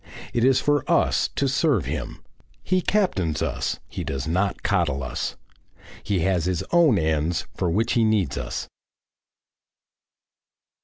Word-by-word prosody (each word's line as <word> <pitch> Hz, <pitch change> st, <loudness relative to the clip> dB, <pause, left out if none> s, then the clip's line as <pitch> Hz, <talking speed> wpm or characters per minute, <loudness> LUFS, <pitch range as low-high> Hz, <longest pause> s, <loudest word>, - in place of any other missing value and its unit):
It 120 Hz, -, +1 dB
is 130 Hz, 0 st, +5 dB
for 145 Hz, -2 st, +1 dB
us -, -, +3 dB
to 140 Hz, -, +1 dB
serve 135 Hz, -, +2 dB
Him. 65 Hz, -, -5 dB, 0.4 s
He 185 Hz, 0 st, +1 dB
captains 95 Hz, -, 0 dB
us, -, -, -2 dB
he -, -, -5 dB
does 70 Hz, +2 st, -4 dB
not 95 Hz, +5 st, 0 dB
coddle 80 Hz, -9 st, +1 dB
us. 65 Hz, -, -3 dB, 0.7 s
He 95 Hz, -4 st, -1 dB
has 90 Hz, -2 st, +1 dB
his 90 Hz, -2 st, -1 dB
own 165 Hz, -10 st, +5 dB
ends 80 Hz, 0 st, 0 dB
for 90 Hz, -, -1 dB
which 110 Hz, +7 st, +1 dB
he 115 Hz, -, +3 dB
needs 110 Hz, -4 st, +1 dB
us. -, -, -4 dB
95 Hz, 140 wpm, -24 LUFS, 80-130 Hz, 0.7 s, is